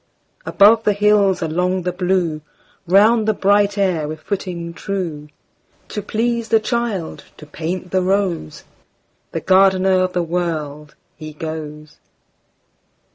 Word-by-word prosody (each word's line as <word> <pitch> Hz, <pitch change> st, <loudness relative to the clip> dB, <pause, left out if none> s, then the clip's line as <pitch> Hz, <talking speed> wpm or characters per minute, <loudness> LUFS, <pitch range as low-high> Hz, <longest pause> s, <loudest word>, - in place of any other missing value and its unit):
Above 220 Hz, +3 st, +5 dB
the 210 Hz, -, +2 dB
hills, 205 Hz, -2 st, +2 dB
along 180 Hz, +3 st, -1 dB
the 180 Hz, -, -1 dB
blue, 180 Hz, -3 st, -1 dB, 0.5 s
Round 215 Hz, +5 st, +4 dB
the 215 Hz, -, +2 dB
bright 200 Hz, +1 st, +2 dB
air 180 Hz, -6 st, 0 dB
with 155 Hz, +1 st, -6 dB
footing 175 Hz, -4 st, -5 dB
true, 170 Hz, -6 st, -5 dB, 0.6 s
To 210 Hz, -, -4 dB
please 230 Hz, +2 st, -2 dB
the 225 Hz, 0 st, +4 dB
child, 220 Hz, -6 st, -3 dB
to 150 Hz, -, -12 dB
paint 170 Hz, +4 st, -5 dB
the 185 Hz, -, +1 dB
rose, 185 Hz, -, -1 dB, 0.7 s
The 165 Hz, -, -4 dB
gardener 190 Hz, +1 st, +3 dB
of 185 Hz, 0 st, -1 dB
the 175 Hz, -1 st, 0 dB
World, 155 Hz, -4 st, -4 dB, 0.2 s
he 155 Hz, 0 st, -9 dB
goes. 155 Hz, -1 st, -8 dB
185 Hz, 130 wpm, -19 LUFS, 160-200 Hz, 0.7 s, Above